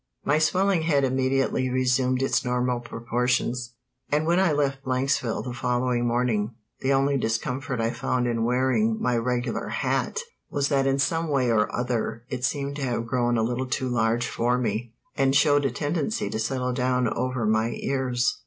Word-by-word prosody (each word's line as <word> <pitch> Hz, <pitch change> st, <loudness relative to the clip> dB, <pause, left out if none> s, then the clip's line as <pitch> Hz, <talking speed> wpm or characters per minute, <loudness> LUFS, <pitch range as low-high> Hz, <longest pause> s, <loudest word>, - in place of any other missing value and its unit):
My 150 Hz, +2 st, +3 dB
swelling 185 Hz, +3 st, +2 dB
head 150 Hz, -4 st, +2 dB
immediately 130 Hz, 0 st, +1 dB
resumed 130 Hz, 0 st, +1 dB
its 135 Hz, -, +1 dB
normal 125 Hz, 0 st, 0 dB
proportions, 120 Hz, +1 st, -1 dB, 0.3 s
and 150 Hz, +2 st, +1 dB
when 170 Hz, +2 st, +3 dB
I 190 Hz, -4 st, +3 dB
left 140 Hz, -2 st, 0 dB
Blanksville 130 Hz, -3 st, 0 dB
the 125 Hz, -, -5 dB
following 125 Hz, 0 st, 0 dB
morning 115 Hz, -2 st, 0 dB, 0.2 s
the 135 Hz, -, 0 dB
only 135 Hz, +1 st, +2 dB
discomfort 125 Hz, +3 st, -2 dB
I 115 Hz, 0 st, +1 dB
found 125 Hz, 0 st, -1 dB
in 115 Hz, -1 st, 0 dB
wearing 130 Hz, -, +1 dB
my 125 Hz, -, +1 dB
regular 125 Hz, +1 st, -1 dB
hat 460 Hz, -, -1 dB, 0.3 s
was 140 Hz, 0 st, 0 dB
that 135 Hz, -2 st, +2 dB
in 135 Hz, 0 st, +2 dB
some 165 Hz, +4 st, 0 dB
way 135 Hz, -5 st, +1 dB
or 105 Hz, -2 st, +2 dB
other 120 Hz, -2 st, -2 dB
it 125 Hz, -2 st, -4 dB
seemed 140 Hz, +1 st, -1 dB
to -, -, -5 dB
have 120 Hz, -3 st, -1 dB
grown 120 Hz, 0 st, +1 dB
a 110 Hz, -, +2 dB
little 125 Hz, +3 st, -1 dB
too 130 Hz, 0 st, -1 dB
large 120 Hz, 0 st, +1 dB
for 120 Hz, +2 st, 0 dB
me, 115 Hz, -1 st, -2 dB, 0.2 s
and 135 Hz, 0 st, +2 dB
showed 145 Hz, -1 st, +4 dB
a 135 Hz, -, +1 dB
tendency 150 Hz, -, -2 dB
to 110 Hz, -, -2 dB
settle 125 Hz, +2 st, -1 dB
down 125 Hz, -1 st, +1 dB
over 125 Hz, +1 st, -1 dB
my 110 Hz, +1 st, +2 dB
ears. 130 Hz, -2 st, 0 dB
125 Hz, 175 wpm, -25 LUFS, 120-135 Hz, 0.3 s, showed